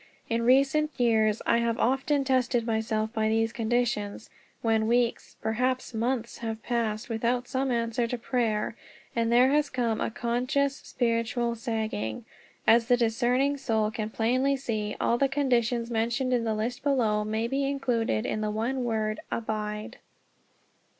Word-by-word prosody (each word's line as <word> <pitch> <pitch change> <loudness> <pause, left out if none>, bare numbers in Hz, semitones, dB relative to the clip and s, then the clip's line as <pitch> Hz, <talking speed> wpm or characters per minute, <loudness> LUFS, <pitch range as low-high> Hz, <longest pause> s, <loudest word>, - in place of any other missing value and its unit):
In 230 0 +1
recent 275 +5 +3
years 220 -3 +2
I 235 - +3
have 235 0 0
often 270 +3 +1
tested 255 -3 +1
myself 220 -1 -1
by 220 -1 +1
these 225 0 +1
conditions, 225 -3 -1 0.3
when 220 -1 +2
weeks, 240 0 0
and - - -39
perhaps 250 +4 -1
months, 235 +1 -2
have 225 -1 -4
passed 225 -2 -1
without 240 +2 -1
some 265 0 -1
answer 235 0 0
to 245 +1 -3
prayer, 230 -3 -1 0.4
and 230 0 +1
there 250 +3 +5
has 295 0 +2
come 235 -3 -1
a - - 0
conscious 255 +5 0
spiritual 235 0 -1
sagging. 220 - -3 0.4
As 230 +1 +5
the 245 -1 +4
discerning 245 +4 +1
soul 220 -5 0
can 215 -1 -3
plainly 255 +5 +1
see, 215 -5 -3
all 235 - +1
the 275 - +3
conditions 245 -4 +1
mentioned 235 +3 0
in 235 -2 +1
the 220 -1 0
list 230 +3 -3
below 230 -7 +1
may 220 +2 -1
be 270 +3 -1
included 235 - 0
in 215 - -2
the 215 - -1
one 235 +5 -1
word 215 -2 -1
"Abide." 215 +1 -4
235 Hz, 155 wpm, -27 LUFS, 220-250 Hz, 0.4 s, there